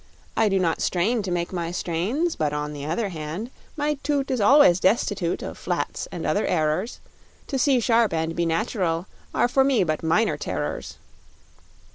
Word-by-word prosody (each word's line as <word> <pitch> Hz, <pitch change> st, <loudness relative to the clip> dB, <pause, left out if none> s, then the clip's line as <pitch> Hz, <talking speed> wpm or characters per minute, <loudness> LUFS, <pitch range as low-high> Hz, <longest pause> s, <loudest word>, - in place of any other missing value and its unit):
I 220 Hz, -, +3 dB
do 195 Hz, -, +2 dB
not 170 Hz, -3 st, 0 dB
strain 215 Hz, +7 st, +1 dB
to 195 Hz, -, -4 dB
make 175 Hz, 0 st, -2 dB
my 170 Hz, -2 st, -2 dB
strains 190 Hz, -, -1 dB
But, 150 Hz, -1 st, -1 dB
on 150 Hz, 0 st, -3 dB
the 145 Hz, 0 st, -6 dB
other 195 Hz, +6 st, -1 dB
hand, 165 Hz, +8 st, -5 dB, 0.3 s
My 295 Hz, -1 st, -1 dB
toot 280 Hz, -2 st, -1 dB
is 255 Hz, -4 st, 0 dB
always 205 Hz, -, +6 dB
destitute 190 Hz, -3 st, +1 dB
Of -, -, -7 dB
flats -, -, -3 dB
or -, -, -5 dB
other -, -, +1 dB
errors; 160 Hz, +7 st, 0 dB, 0.5 s
To 270 Hz, -, -2 dB
see 265 Hz, -1 st, +4 dB
sharp 230 Hz, -1 st, +3 dB
and 160 Hz, 0 st, -1 dB
be 170 Hz, -1 st, 0 dB
natural 170 Hz, -1 st, -1 dB, 0.3 s
are -, -, +2 dB
For 265 Hz, +2 st, +3 dB
me 265 Hz, -7 st, +3 dB
but 155 Hz, -3 st, -1 dB
minor 165 Hz, +7 st, +2 dB
terrors. -, -, -4 dB
185 Hz, 175 wpm, -24 LUFS, 165-240 Hz, 0.5 s, always